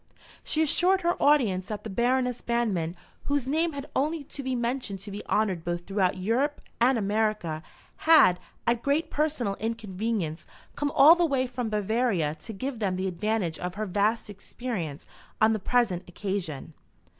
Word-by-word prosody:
She 315 - +1
assured 365 +5 +3
her 345 0 +2
audience 220 -11 +3
that 210 -1 -5
the 220 - -6
Baroness 250 +3 +1
Banmann, 205 -9 -1 0.3
whose 285 -3 0
name 320 +3 +1
had 280 -1 -5
only 305 +3 0
to 280 - -8
be 260 -1 -2
mentioned 235 -4 -2
to 200 +1 -8
be 205 +1 -6
honoured 190 -6 +1
both 175 0 -3
throughout 195 -2 +1
Europe 240 +10 0 0.2
and 245 +2 +4
America, 210 -6 0 0.4
had, 305 - +6 0.3
at 235 0 +1
great 285 +5 0
personal 290 -9 0
inconvenience, 215 -6 -3 0.3
come 290 0 -1
all 290 +4 +9
the 350 0 +1
way 270 -3 +1
from 245 -2 -3
Bavaria 210 -6 +1
to 225 - -7
give 250 +4 -4
them 195 -4 0
the 185 +1 -2
advantage 185 -2 -1
of 180 +1 -4
her 215 +1 -2
vast 205 +5 0
experience 200 - -5 0.3
on 220 +1 +5
the 215 - -1
present 205 -4 +1
occasion. 175 -6 -4
220 Hz, 165 wpm, -27 LUFS, 190-260 Hz, 0.4 s, all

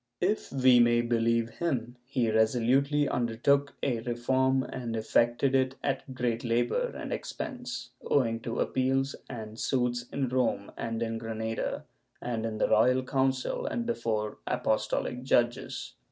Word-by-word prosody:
If 200 +4 0
we 130 -2 +5
may 120 0 +5
believe 115 -1 +1
him, 125 -8 -1
he 125 -4 +1
resolutely 130 +6 +3
undertook 140 +4 +1
a 120 -4 +1
reform 130 +3 +1
and 120 -3 -5
effected 120 +4 +2
it 130 0 +2
at 135 -1 -2
great 120 -2 -1
labor 120 - +1
and - - -4
expense, 255 -4 -5
owing 115 -5 +1
to 115 0 -3
appeals 135 +1 +1
and 110 -3 -7
suits 125 -1 0
in 135 -3 -1
Rome 125 -5 0
and 115 0 -3
in 115 0 -3
Granada 115 0 -3 0.3
and 115 -2 -2
in 110 -1 -4
the - - +2
Royal 125 +4 +4
Council 130 0 0
and 235 - -2
before 110 - -2
apostohc 125 +3 0
judges. 120 -2 0
120 Hz, 140 wpm, -29 LUFS, 115-135 Hz, 0.3 s, we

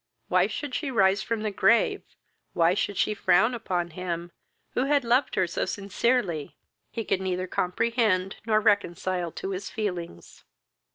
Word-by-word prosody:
Why - - +4
she 290 -2 -5
should 270 +1 -3
rise 195 -1 +4
from 225 -1 -2
the 215 - -1
grave, 235 - +3 0.5
why 170 +1 +3
she 205 +1 -1
should 210 +3 0
frown 220 +8 +4
upon 180 -7 -2
him, 175 0 -4 0.4
who 255 - 0
had 285 -1 +2
loved 245 +3 +2
her 185 - +3
so 170 - -2
sincerely, 200 - -1 0.3
he 225 -2 -5
could 190 - 0
neither 185 -1 -1
comprehend 190 0 0
nor 215 -1 +3
reconcile 185 -4 0
to 190 - -5
his 190 +1 -4
feelings. 180 - -5
200 Hz, 155 wpm, -26 LUFS, 180-230 Hz, 0.5 s, Why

